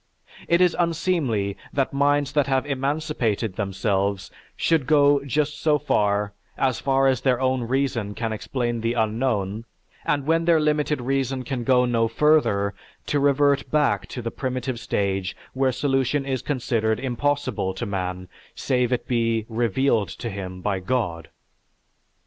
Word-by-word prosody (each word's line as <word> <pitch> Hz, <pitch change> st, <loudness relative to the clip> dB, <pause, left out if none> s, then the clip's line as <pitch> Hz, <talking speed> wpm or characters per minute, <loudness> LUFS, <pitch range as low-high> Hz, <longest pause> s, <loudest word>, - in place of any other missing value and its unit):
It 170 Hz, +1 st, +3 dB
is 180 Hz, -2 st, +4 dB
unseemly 160 Hz, -, 0 dB, 0.2 s
that 135 Hz, -1 st, 0 dB
minds 145 Hz, 0 st, +2 dB
that 145 Hz, -2 st, +1 dB
have 135 Hz, -1 st, +1 dB
emancipated 135 Hz, -7 st, -1 dB
themselves 100 Hz, -1 st, -1 dB, 0.3 s
should 160 Hz, -6 st, +1 dB
go 145 Hz, -2 st, +4 dB
just 145 Hz, +2 st, -1 dB
so 150 Hz, -2 st, +3 dB
far 105 Hz, -7 st, 0 dB, 0.2 s
as 130 Hz, -4 st, +1 dB
far 135 Hz, 0 st, +2 dB
as 130 Hz, -3 st, +2 dB
their 125 Hz, -2 st, +2 dB
own 130 Hz, -1 st, +1 dB
reason 120 Hz, -5 st, -1 dB
can 115 Hz, -2 st, -2 dB
explain 120 Hz, +1 st, -2 dB
the 115 Hz, +1 st, 0 dB
unknown 110 Hz, -2 st, -1 dB, 0.4 s
and 145 Hz, -2 st, 0 dB
when 165 Hz, +2 st, +2 dB
their 170 Hz, -2 st, +4 dB
limited 150 Hz, -2 st, +1 dB
reason 135 Hz, 0 st, -1 dB
can 125 Hz, -1 st, -3 dB
go 125 Hz, 0 st, +4 dB
no 115 Hz, -2 st, +2 dB
further 115 Hz, -7 st, +2 dB, 0.3 s
to 145 Hz, -, 0 dB
revert 140 Hz, 0 st, +2 dB
back 150 Hz, -2 st, +1 dB
to 125 Hz, -, -6 dB
the 115 Hz, -, -3 dB
primitive 130 Hz, -2 st, -3 dB
stage 95 Hz, -3 st, -2 dB, 0.2 s
where 130 Hz, 0 st, +2 dB
solution 135 Hz, +1 st, 0 dB
is 130 Hz, -2 st, -2 dB
considered 115 Hz, -5 st, 0 dB
impossible 135 Hz, -5 st, -1 dB
to -, -, -4 dB
man 90 Hz, -2 st, -3 dB, 0.3 s
save 125 Hz, -1 st, 0 dB
it 125 Hz, -, -1 dB
be 115 Hz, -2 st, 0 dB
"revealed 115 Hz, -2 st, +1 dB
to 115 Hz, +4 st, -6 dB
him 95 Hz, -2 st, -6 dB
by 100 Hz, 0 st, -1 dB
God." 90 Hz, -6 st, -2 dB
130 Hz, 150 wpm, -24 LUFS, 110-140 Hz, 0.4 s, is